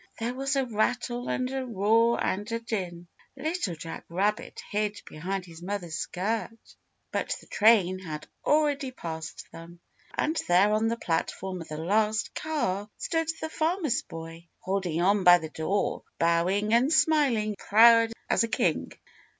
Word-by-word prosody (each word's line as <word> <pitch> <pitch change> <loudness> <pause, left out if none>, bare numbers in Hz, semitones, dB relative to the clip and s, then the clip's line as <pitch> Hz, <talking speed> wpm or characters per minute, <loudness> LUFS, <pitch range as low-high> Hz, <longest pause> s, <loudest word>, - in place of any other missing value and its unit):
There 235 +2 -2
was 275 +2 -1
a 270 -1 +1
rattle 245 +2 -1
and 255 - 0
a 265 -1 -2
roar 230 +1 +2
and 205 +4 -2
a 230 - -1
din. 185 -7 -4 0.3
Little 310 - -2
Jack 165 +1 -7
Rabbit 200 +5 -1
hid 210 0 -1
behind 185 +4 -4
his 165 -1 -12
mother's 180 -3 -4
skirt, 220 +7 -2 0.5
but - - -2
the - - -16
train 200 -4 +4
had 155 -5 -7 0.2
already 290 -2 +2
passed 160 -9 -7
them. 170 +1 -12 0.4
And 315 +2 0
there 190 +4 +4
on 215 +1 +2
the 230 +1 -1
platform 185 0 -2
of 165 - -9
the 155 - -6
last 210 +6 +1
car, 210 -11 -2
stood 325 -1 -1
the 315 - -3
Farmer's 315 - 0
Boy, 165 +1 -10
holding 185 -4 -2
on 200 +1 +3
by 175 0 +9
the 160 -2 -7
door, 190 +7 -1 0.2
bowing 180 +6 +2
and 250 +5 +4
smiling 285 -10 +3
and 210 - -4
proud 230 +1 +6 0.2
as - - +3
a - - 0
king. 225 - 0
210 Hz, 160 wpm, -27 LUFS, 175-240 Hz, 0.5 s, by